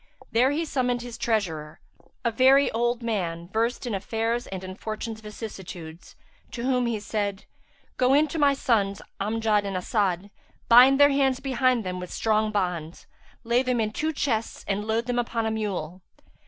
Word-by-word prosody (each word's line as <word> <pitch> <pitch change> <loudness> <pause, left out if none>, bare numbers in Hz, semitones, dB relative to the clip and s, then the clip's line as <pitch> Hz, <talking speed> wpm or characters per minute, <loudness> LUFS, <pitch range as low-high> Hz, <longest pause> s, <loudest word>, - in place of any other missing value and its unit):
There 245 +3 +4
he 310 +4 -1
summoned 250 -4 -1
his 240 -1 -7
treasurer, 175 -11 -2 0.5
a 235 - +2
very 265 +4 +5
old 240 +1 0
man, 175 -7 -2
versed 230 +5 -1
in 240 - -3
affairs 225 +4 -2
and 190 -1 -6
in 185 0 -6
fortune's 220 +2 -6
vicissitudes, 185 -6 -9 0.4
to 235 - -4
whom 250 -1 +1
he 225 -2 -1
said, 205 -1 -3 0.5
"Go 255 +1 +4
in 305 +2 +4
to 325 - -3
my 285 -1 +4
sons, 200 -7 0 0.2
Amjad 215 0 +1
and 195 -2 -3
As'ad; 195 0 -1 0.4
bind 255 +4 +7
their 285 0 +7
hands 270 -2 +2
behind 255 -3 +1
them 180 -1 -4
with 180 -1 -7
strong 215 -1 +1
bonds, 180 -5 -3 0.4
lay 235 +1 +2
them 250 -2 0
in 215 -1 0
two 310 +8 -1
chests 235 -7 -2
and 205 +1 -1
load 225 +1 0
them 245 0 -1
upon 230 -1 -1
a 220 - 0
mule. 190 -5 -3
225 Hz, 170 wpm, -26 LUFS, 195-250 Hz, 0.5 s, bind